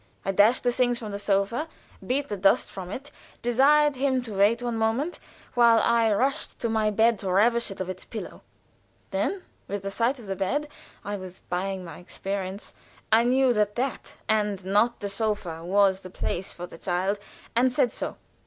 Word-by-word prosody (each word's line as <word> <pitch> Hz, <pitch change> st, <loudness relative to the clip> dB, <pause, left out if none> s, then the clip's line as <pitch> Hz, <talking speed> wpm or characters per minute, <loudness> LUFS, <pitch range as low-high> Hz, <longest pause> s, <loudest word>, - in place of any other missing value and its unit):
I 195 Hz, -, +1 dB
dashed 210 Hz, +6 st, +4 dB
the 245 Hz, -, +3 dB
things 245 Hz, -1 st, 0 dB
off 215 Hz, -, -5 dB
the 200 Hz, -, -4 dB
sofa, 205 Hz, +9 st, 0 dB, 0.4 s
beat 275 Hz, +3 st, -1 dB
the 205 Hz, -, -3 dB
dust 195 Hz, 0 st, +3 dB
from 185 Hz, -2 st, -7 dB
it, 275 Hz, +8 st, -7 dB, 0.3 s
desired 280 Hz, +4 st, +4 dB
him 260 Hz, -1 st, +1 dB
to 225 Hz, -3 st, -7 dB
wait 210 Hz, +5 st, +3 dB
one 240 Hz, -1 st, -1 dB
moment 225 Hz, +9 st, 0 dB, 0.3 s
while 235 Hz, -2 st, +6 dB
I 230 Hz, -1 st, +3 dB
rushed 270 Hz, +8 st, 0 dB
to 235 Hz, -, 0 dB
my 220 Hz, -1 st, +2 dB
bed 225 Hz, +1 st, +3 dB
to 190 Hz, -, -2 dB
ravish 235 Hz, +5 st, +3 dB
it 195 Hz, -, -8 dB
of 185 Hz, -, -3 dB
its 185 Hz, 0 st, -6 dB
pillow. 220 Hz, -, -8 dB, 0.7 s
Then 390 Hz, -2 st, -1 dB, 0.2 s
with 200 Hz, 0 st, -4 dB
the 195 Hz, -, -3 dB
sight 235 Hz, +6 st, +1 dB
of 235 Hz, -, -11 dB
the 195 Hz, -1 st, -3 dB
bed 275 Hz, +11 st, -1 dB, 0.4 s
(I 205 Hz, +1 st, -3 dB
was 185 Hz, -1 st, -10 dB
buying 185 Hz, +1 st, -2 dB
my 165 Hz, -3 st, -9 dB
experience) 195 Hz, +2 st, -5 dB, 0.4 s
I 225 Hz, +2 st, +6 dB
knew 255 Hz, 0 st, +4 dB
that 210 Hz, -2 st, +1 dB
that, 255 Hz, +1 st, -3 dB
and 210 Hz, -3 st, 0 dB
not 210 Hz, +5 st, +2 dB
the 205 Hz, -, -2 dB
sofa, 200 Hz, -5 st, -2 dB
was 190 Hz, +1 st, +3 dB
the 185 Hz, -, -10 dB
place 185 Hz, +1 st, -3 dB
for 175 Hz, -, -7 dB
the 170 Hz, -, -12 dB
child, 190 Hz, +3 st, -1 dB, 0.4 s
and 250 Hz, +2 st, +4 dB
said 245 Hz, -1 st, +2 dB
so. -, -, -5 dB
215 Hz, 190 wpm, -26 LUFS, 195-245 Hz, 0.7 s, while